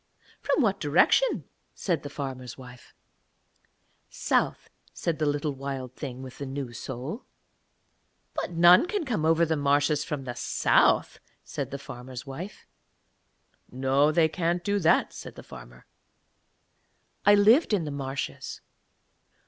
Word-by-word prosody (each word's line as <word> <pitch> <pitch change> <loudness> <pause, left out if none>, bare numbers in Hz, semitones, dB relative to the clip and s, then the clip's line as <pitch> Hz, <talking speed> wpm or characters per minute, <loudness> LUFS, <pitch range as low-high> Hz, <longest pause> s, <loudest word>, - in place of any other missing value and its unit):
'From 295 - +1
what 200 -3 +1
direction?' 170 - +3 0.3
said 170 -6 -1
the 145 - -7
farmer's 130 -3 -6
wife. 125 -1 -14 1.1
'South,' - - 0 0.3
said 165 -2 -2
the 155 - +1
little 145 0 -1
Wild 135 -2 -6
Thing 130 -3 -6
with 130 -1 -10
the 140 - -4
new 135 -2 -5
soul. 130 - -6 1.1
'But - - -3
none 175 - +6
can 405 -4 -2
come 220 - -1
over 165 +1 +4
the 160 0 0
marshes 145 +1 +2
from 145 -3 -4
the 125 -2 -5
south,' - - +2 0.2
said - - -5
the 140 - -5
farmer's 125 -1 -9
wife. 165 +9 -8 1.0
'No, 135 +3 +2
they 160 0 +4
can't 175 +1 -1
do 205 0 +1
that,' 165 -2 +3
said - - -9
the - - -10
farmer. - - -13 1.4
'I 205 +1 +7
lived 220 +10 +5
in 200 -5 +2
the 150 - -4
marshes.' 135 -1 -5
145 Hz, 135 wpm, -27 LUFS, 130-175 Hz, 1.4 s, I